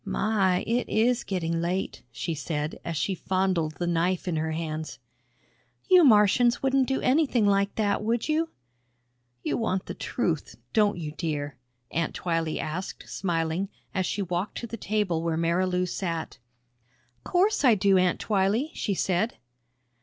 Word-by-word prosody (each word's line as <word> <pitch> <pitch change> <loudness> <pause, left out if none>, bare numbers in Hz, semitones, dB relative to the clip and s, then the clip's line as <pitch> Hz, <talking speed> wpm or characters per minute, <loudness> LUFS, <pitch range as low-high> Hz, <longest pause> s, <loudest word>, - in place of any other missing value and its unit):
"My, 195 -4 +1
it 240 +2 0
is 235 +3 +2
getting 165 -3 -1
late," 180 +3 -2
she 165 +7 -3
said 150 0 -3
as 165 -2 -3
she 170 +6 0
fondled 185 -4 0
the 175 - -2
knife 175 +2 0
in 175 - 0
her 160 +1 -1
hands. 155 -3 -4 0.9
"You 365 -2 +7
Martians 235 0 +5
wouldn't 265 -1 +3
do 270 - 0
anything 260 -5 +3
like 200 0 +2
that, 210 -2 +1
would 230 +1 0
you?" 320 +1 +1 0.9
"You - - 0
want 190 -5 -1
the - - -5
truth, - - -2 0.2
don't 210 -4 +3
you, 155 -3 -4
dear?" 150 -3 -3 0.4
Aunt 165 -1 -1
Twylee 165 -2 -1
asked, 175 +5 -5
smiling, 170 +1 -1 0.2
as 185 -1 0
she 200 - -1
walked 180 +2 -3
to - - -4
the 230 - -6
table 205 -6 -1
where 165 -1 -1
Marilou 180 +2 +1
sat. 170 -3 -4 0.8
"'Course 375 0 +2
I 245 -5 +6
do, 195 -1 +4
Aunt 180 -1 +2
Twylee," 210 +8 +1
she 200 - -2
said. 190 +6 0
185 Hz, 155 wpm, -27 LUFS, 165-220 Hz, 0.9 s, You